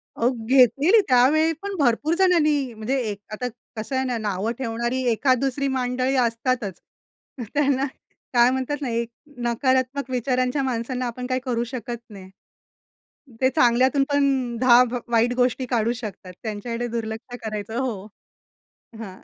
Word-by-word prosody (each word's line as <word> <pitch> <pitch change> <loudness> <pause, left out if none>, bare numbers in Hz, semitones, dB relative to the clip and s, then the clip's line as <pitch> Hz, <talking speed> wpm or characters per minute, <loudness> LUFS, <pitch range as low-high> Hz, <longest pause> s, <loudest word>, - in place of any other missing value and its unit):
अहो 235 - +2 0.2
घेतलीली, 275 - +5
त्यावेळी 285 +5 +4
पण 400 0 -4
भरपूर 285 +4 +2
जणांनी 300 -9 +3
म्हणजे 220 +5 -2
एक, 200 - -7
आता. 245 +4 -3 0.3
कसं 220 +5 -4
आहे 260 - 0
ना 250 -2 -1
नावं 210 0 -2
ठेवणारी 240 +1 -2
एखाद, 255 +2 +2
दुसरी 275 +1 -1
मंडळी 255 +1 0
असतातच. 230 -5 0 0.7
त्यांना, 280 -2 +2 0.5
काय 240 0 +6
म्हणतात 265 +3 -2
ना 270 - -2
एक, 235 0 -2 0.3
नकारात्मक 260 +2 0
विचारांच्या 255 +2 0
माणसांना 250 0 -2
आपण 250 +1 -5
काही 255 0 0
करू 235 -2 0
शकत 240 -1 -5
नाही. 195 -2 -11 1.1
ते 260 - +4
चांगल्यातून 260 0 +4
पण 270 -4 +1
10 250 0 +7
भ 250 - -2 0.4
गोष्टी 255 +1 +1
काढू 235 -1 +1
शकतात. 210 -6 -8
त्यांच्याकडे 230 +2 -4
दुर्लक्ष 230 +1 -5
करायचं. 215 0 -4
हो. 225 -7 -3 0.9
हां. 190 -4 -8
250 Hz, 135 wpm, -23 LUFS, 230-265 Hz, 1.1 s, 10